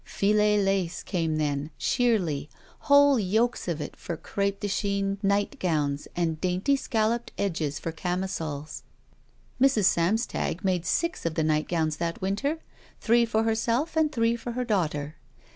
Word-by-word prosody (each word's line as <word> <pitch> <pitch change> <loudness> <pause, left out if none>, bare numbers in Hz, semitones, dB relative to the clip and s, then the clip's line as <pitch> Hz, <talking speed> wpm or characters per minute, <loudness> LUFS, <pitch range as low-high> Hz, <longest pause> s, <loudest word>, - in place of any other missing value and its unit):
Filet 210 +1 +2
lace 195 -3 0
came 165 -4 -1
then, 145 -1 -1
sheerly, 185 - +1 0.4
whole 285 -2 +6
yokes 220 +5 0
of 170 -3 -2
it 150 - -6
for 170 - -6
cr&pe 200 +4 -1
de 205 - -2
Chine 200 0 -1
nightgowns 170 -8 0
and 165 -3 -1
dainty 185 +9 +1
scalloped 230 -2 -1
edges 160 -7 -1
for 165 - -4
camisoles. 165 -4 -4 0.8
Mrs. 260 -7 +4
Samstag 185 0 0
made 180 -3 0
six 335 - 0
of 165 -1 -2
the 160 - +1
nightgowns 155 0 0
that 170 0 -3
winter 205 +12 -1 0.2
— - - -28
three 235 +1 +3
for 220 -1 +1
herself 230 +7 0
and 315 -1 +2
three 230 -3 +1
for 235 0 -6
her 250 +1 -2
daughter. 155 -8 -1
195 Hz, 145 wpm, -27 LUFS, 165-230 Hz, 0.8 s, whole